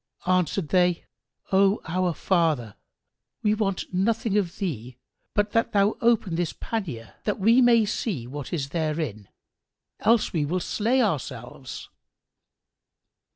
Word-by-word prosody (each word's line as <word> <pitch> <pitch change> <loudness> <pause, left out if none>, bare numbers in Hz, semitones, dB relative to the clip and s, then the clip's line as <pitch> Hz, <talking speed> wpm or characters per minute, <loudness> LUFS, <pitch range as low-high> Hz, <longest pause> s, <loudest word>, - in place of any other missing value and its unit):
Answered 185 -2 +1
they, 180 -2 +2 0.5
"O 195 +2 +4
our 180 0 0
father, 155 - +1 0.7
we 210 - +3
want 195 -4 -2
nothing 210 +2 +1
of 195 -4 0
thee 125 - -4 0.4
but 205 0 +1
that 230 0 +1
thou 200 +1 +3
open 230 -6 +2
this 170 0 -1
pannier 155 - -4
that 210 - 0
we 230 +6 +5
may 235 -3 +5
see 200 - -2
what 140 +2 -7
is 140 -6 -2
therein, 155 - -3 0.7
else 230 0 +3
we 160 -4 +1
will 170 +6 -1
slay 235 +8 +1
ourselves." 130 - -4
185 Hz, 125 wpm, -25 LUFS, 150-210 Hz, 0.7 s, we